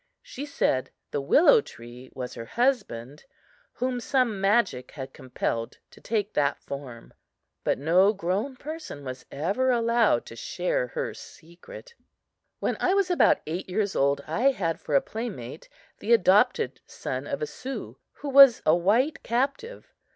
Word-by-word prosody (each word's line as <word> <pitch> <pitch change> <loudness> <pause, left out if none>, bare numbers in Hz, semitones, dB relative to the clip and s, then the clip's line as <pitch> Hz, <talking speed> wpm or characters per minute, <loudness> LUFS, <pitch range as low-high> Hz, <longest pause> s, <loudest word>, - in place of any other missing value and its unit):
She 285 +3 -7
said 130 - 0 0.2
the 145 - -1
willow 345 - +5
tree 120 - -12
was 125 -1 -5
her 115 - -7
husband, 175 - -1 0.5
whom 250 0 -2
some 240 -5 0
magic 195 - +1
had 135 -2 -8
compelled 115 -2 -4
to - - -17
take 210 -2 -2
that 145 -1 +1
form; 135 -4 -9 0.5
but - - +1
no 175 +8 +4
grown 200 +7 -2
person 305 - -8
was 130 -1 -7
ever 195 - 0
allowed 235 -1 +2
to - - -10
share - - -2
her 485 -1 -4
secret. 325 - -13 0.6
When - - -2
I 370 - +2
was 390 -2 +1
about 355 - +4
eight 170 +5 -5
years 200 +1 -1
old 140 +1 +2
I 230 - +2
had 175 -11 -2
for 145 - -2
a 140 - +5
playmate 190 - -7 0.3
the 230 - +2
adopted 225 - +3
son - - -5
of - - -3
a - - +1
Sioux, 270 - -7
who 290 - -7
was 275 -3 +8
a 155 - +5
white 225 - +1
captive. 275 - -3
210 Hz, 150 wpm, -26 LUFS, -, 0.6 s, was